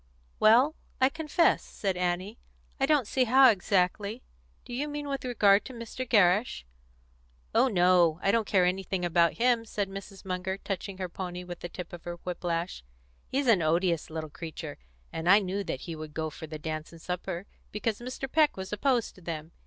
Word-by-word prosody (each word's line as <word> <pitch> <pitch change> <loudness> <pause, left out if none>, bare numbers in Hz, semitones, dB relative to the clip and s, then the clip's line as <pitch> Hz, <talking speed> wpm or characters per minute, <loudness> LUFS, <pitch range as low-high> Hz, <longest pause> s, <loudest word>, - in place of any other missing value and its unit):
"Well, 245 +8 +6 0.3
I 260 - +5
confess," 320 +3 +2
said 195 -3 -3
Annie, 180 +4 -2 0.4
"I 270 - +2
don't 295 -5 +3
see 255 +4 +1
how, 260 +1 +7
exactly. 200 +3 0 0.4
Do 245 - -8
you 280 +5 -2
mean 295 0 -5
with 275 -1 -3
regard 210 -5 +4
to 260 - -8
Mr. 235 +2 -6
Gerrish?" 205 - +3 0.9
"Oh - - +5
no; 180 -5 +4
I 195 - +4
don't 225 -2 +1
care 185 -3 +3
anything 185 0 -1
about 170 0 +3
him," 240 -1 +2
said 205 -3 -3
Mrs. 195 0 -9
Munger, 190 +1 -2
touching 195 0 -5
her 185 -1 -3
pony 180 0 -6
with 175 -1 -8
the 175 - -6
tip 175 0 -8
of 175 - -9
her 175 0 -4
whip 180 -1 -5
lash. 170 - -2 0.4
"He's 275 +1 -1
an 225 -7 +5
odious 170 +1 +1
little 155 -1 -5
creature, 160 -2 -7 0.3
and 165 +2 -1
I 200 - +9
knew 200 0 -1
that - - -4
he 165 -3 -6
would 155 -1 -9
go 160 -1 -2
for 160 +2 -9
the 155 0 -6
dance 155 0 -5
and 165 - -13
supper 180 +1 -4 0.3
because 210 0 -2
Mr. 255 +2 -5
Peck 305 -1 +3
was 190 +1 -5
opposed 240 +2 +1
to 185 - -17
them. 160 -1 -6
190 Hz, 190 wpm, -29 LUFS, 175-230 Hz, 0.9 s, I